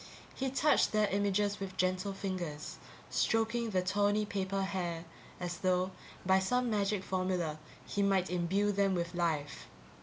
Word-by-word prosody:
He 265 0 -1
touched 280 0 +3
their 215 -1 +4
images 205 +1 +1
with 190 -1 -6
gentle 185 +2 +1
fingers, 180 -6 -4 0.3
stroking 225 +1 +1
the 185 -3 +1
tawny 205 +2 +2
paper 195 -1 -1
hair, 175 -3 -2 0.3
as 175 -1 -4
though, 185 0 +1 0.3
by 190 +1 +5
some 250 +5 +1
magic 200 -2 +1
formula, 185 -5 -1 0.3
he 200 - -1
might 195 -2 +2
imbue 185 +4 +1
them 200 -1 +2
with 170 0 -2
life. 160 -5 -1
190 Hz, 145 wpm, -33 LUFS, 180-205 Hz, 0.3 s, by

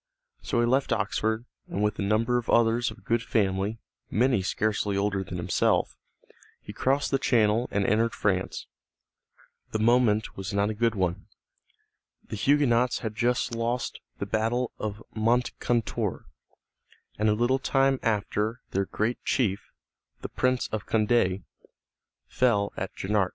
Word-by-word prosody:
So - - -1
he - - +3
left 130 +3 +1
Oxford, 110 +3 0 0.2
and 100 - -2
with 105 0 0
a - - 0
number 110 +4 +2
of 120 - -8
others 115 +1 +3
of 105 - -13
good 115 0 +1
family, 100 -2 0 0.3
many 120 0 +2
scarcely 105 +1 0
older 100 -1 0
than 90 -1 -6
himself, 85 - +1 0.6
he - - -10
crossed 135 +2 0
the 135 - +2
Channel 115 -2 +2
and 100 -1 0
entered 115 +3 +2
France. 95 -2 -1 1.1
The - - 0
moment 110 -1 +2
was 95 +1 -5
not 100 +1 +2
a - - -3
good 115 +1 +1
one. 95 +1 -1 1.0
The - - -4
Huguenots 125 0 +2
had 110 - -2
just 120 +2 0
lost 115 +2 -2 0.2
the - - -3
battle 115 +4 0
of 105 0 -4
Moncontour, 120 0 0 0.9
and 110 0 +3
a - - +4
little 120 +4 +2
time 135 0 +2
after 110 +1 -1
their 95 +1 0
great 110 +5 -2
chief, 100 -7 0 0.5
the - - -5
Prince 125 -1 0
of 110 -1 -4
Condé, 105 -4 +2 0.8
fell 105 -5 +1
at 95 - -4
Jarnac. 100 -1 0
110 Hz, 145 wpm, -27 LUFS, 100-120 Hz, 1.1 s, a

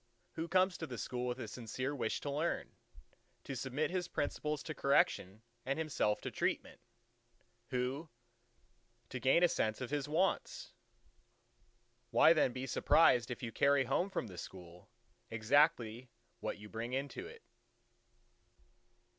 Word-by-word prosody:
—Who 165 +1 -4
comes 185 +1 +2
to 160 - -4
the 125 - -6
School 125 +3 -3
with 125 0 -2
a 120 - -5
sincere 125 +5 -4
wish 115 -5 -1
to 145 - -3
learn: 155 +4 -1 0.7
to 135 - -5
submit 135 +6 -1
his 180 -1 -1
principles 150 -1 -2
to 155 - -5
correction 110 -8 +2 0.2
and 135 +4 -1
himself 150 -9 0
to - - -4
treatment? - - -2 0.9
Who, 130 +6 -2 1.0
to 130 - -4
gain 135 +8 +4
a - - +8
sense 110 -9 0
of 130 0 -5
his 145 -1 -1
wants? 190 - 0 1.4
Why 160 - +7
then 150 -6 +3
be 130 +2 -4
surprised 125 -2 +4
if 125 0 -5
you 115 - -3
carry 140 +4 +4
home 135 +9 0
from 190 - -2
the 90 -5 -8
School 90 -1 -10 0.4
exactly 120 0 +2 0.3
what - - -3
you 105 +1 -10
bring 115 +3 -5
into 140 - -3
it? 460 0 -13
135 Hz, 145 wpm, -35 LUFS, 120-155 Hz, 1.4 s, a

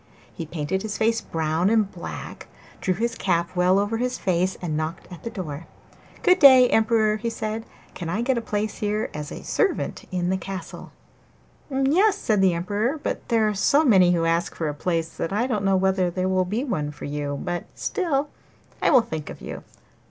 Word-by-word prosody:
He 165 - -6
painted 165 +4 -2
his 215 0 -4
face 230 +1 +1
brown 160 +3 0
and 215 -3 +2
black, 175 - -8 0.3
drew 185 - 0
his 230 +4 -1
cap 170 -5 -1
well 180 +1 +4
over 205 +3 0
his 250 +1 -1
face, 185 0 0
and 165 -4 -3
knocked 155 +2 -4
at 175 - -10
the 230 - -5
door. 165 -6 -6 0.6
'Good 365 +1 +5
day, 260 -4 +9
Emperor,' 220 -1 +3
he 230 +2 -2
said. 220 0 -4 0.3
'Can 170 -2 -5
I 210 +7 -1
get 260 +1 +1
a 235 - -1
place 215 -1 -2
here 210 +1 -1
as 150 -1 -5 0.2
servant 395 - 0
in 180 -1 -1
the 190 - +1
castle?' 190 +1 -7 0.8
'Yes,' 305 +10 +3
said 215 - +1
the 185 -3 +4
Emperor, 210 - -1
'but 295 - -4
there 225 -3 +3
are 210 - 0
so 280 +10 +3
many 185 -8 +5
who 165 -1 +1
ask 165 +1 0
for 160 - -2
a - - -3
place 165 +2 -1
that 165 - -2
I 215 +5 +1
don't 215 -6 -1
know 195 -1 +3
whether 190 -1 +2
there 185 +1 -1
will 185 -1 +2
be 215 +8 -2
one 150 - -2
for 150 - -9
you; 145 -1 -3
but, 175 0 -3
still, 295 -7 -1 0.5
I - - +3
will 250 - +6
think 155 -8 -6
of - - -9
you. - - -7
195 Hz, 200 wpm, -24 LUFS, 170-230 Hz, 0.8 s, day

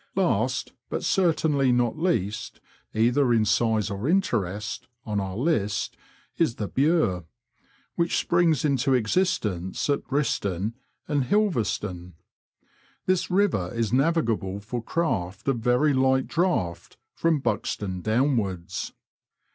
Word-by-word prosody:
Last, - - 0 0.2
but - - -3
certainly 155 - +2
not 120 -1 +2
least 110 - -1 0.3
(either 120 +4 +2
in 115 -2 +3
size 110 -3 +1
or 100 +8 -2
interest), 105 - -1 0.2
on 105 -2 -1
our 95 0 -4
list 110 -8 0 0.4
is 155 -9 +2
the 105 - -3
Bure, 135 - +1 0.7
which 170 0 0
springs 170 -5 +2
into 135 -2 +2
existence 110 - 0
at 140 - 0
Briston 110 - -1 0.3
and 145 -4 +1
Hindolvestone. 105 - 0 0.9
This 185 -1 +1
river 180 - +1
is 115 -1 -1
navigable 125 - +1
for 120 +4 -5
craft 100 - -2
of 135 -4 +1
very 125 +5 +3
light 130 0 +3
draught 115 - -1 0.2
from 165 -2 +1
Buxton 100 -5 -2
downwards. 110 -6 -1
120 Hz, 115 wpm, -26 LUFS, 100-155 Hz, 0.9 s, in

